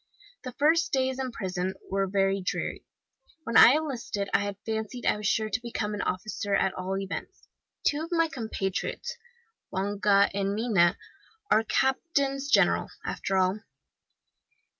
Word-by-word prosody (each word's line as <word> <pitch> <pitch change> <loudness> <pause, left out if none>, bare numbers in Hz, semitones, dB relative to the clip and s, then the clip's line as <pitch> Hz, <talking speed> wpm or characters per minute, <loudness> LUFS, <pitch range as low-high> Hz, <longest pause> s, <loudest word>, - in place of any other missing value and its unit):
"The 255 -2 -6
first 315 +6 +2
days 260 -1 0
in 260 -1 -2
prison 190 -3 -3 0.2
were 195 0 +1
very 195 0 +1
dreary. 180 - -3 0.6
When 230 -4 -4
I 240 - +9
enlisted 250 -9 -2
I - - +5
had 200 -1 -3
fancied 220 +2 -4
I - - +3
was 210 -1 -3
sure 220 +1 +1
to 225 +3 -1
become 220 -3 -3
an 205 - -3
officer, 200 +2 -2
at 190 -1 +1
all 190 +1 -3
events. 195 0 -6 0.4
Two 295 +1 +2
of 330 - -14
my 330 -1 +3
compatriots, 225 - -3 0.6
Longa 200 +1 +2
and 200 0 -1
Mina, 205 -7 +3 0.5
are 220 - +5
captains 275 +2 0
general, - - +3 0.2
after 195 - -2
all. 185 +2 +2
210 Hz, 145 wpm, -28 LUFS, 195-260 Hz, 0.6 s, I